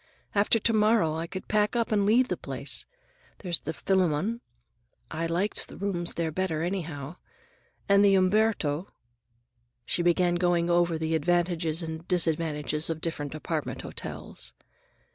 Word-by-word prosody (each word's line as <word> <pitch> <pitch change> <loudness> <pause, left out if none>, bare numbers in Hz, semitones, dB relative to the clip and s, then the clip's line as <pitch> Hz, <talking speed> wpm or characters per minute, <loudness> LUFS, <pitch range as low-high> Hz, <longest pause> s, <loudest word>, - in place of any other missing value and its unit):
After 205 +2 +3
to 230 +1 +1
morrow 215 -6 +3
I 165 +1 -3
could 185 +2 -7
pack 210 +1 +1
up 230 -1 0
and 205 -2 +2
leave 245 +4 +4
the - - 0
place. - - -3 0.5
There's 175 -4 0
the 160 - -4
Phillamon—I 160 - -2
liked 180 +5 -1
the - - -11
rooms 185 -3 -2
there 165 -1 -1
better, 165 -2 -1
anyhow—and 175 +3 -3
the 200 -1 +6
Umberto—" 185 -4 +2 1.0
She - - 0
began 175 0 +3
going 175 -1 +2
over 170 -1 +3
the 160 0 -1
advantages 170 0 +1
and 160 +1 -6
disadvantages 160 -3 0
of 165 -1 -2
different 150 -3 -3
apartment 155 0 -3
hotels. - - -6
175 Hz, 135 wpm, -28 LUFS, 160-195 Hz, 1.0 s, the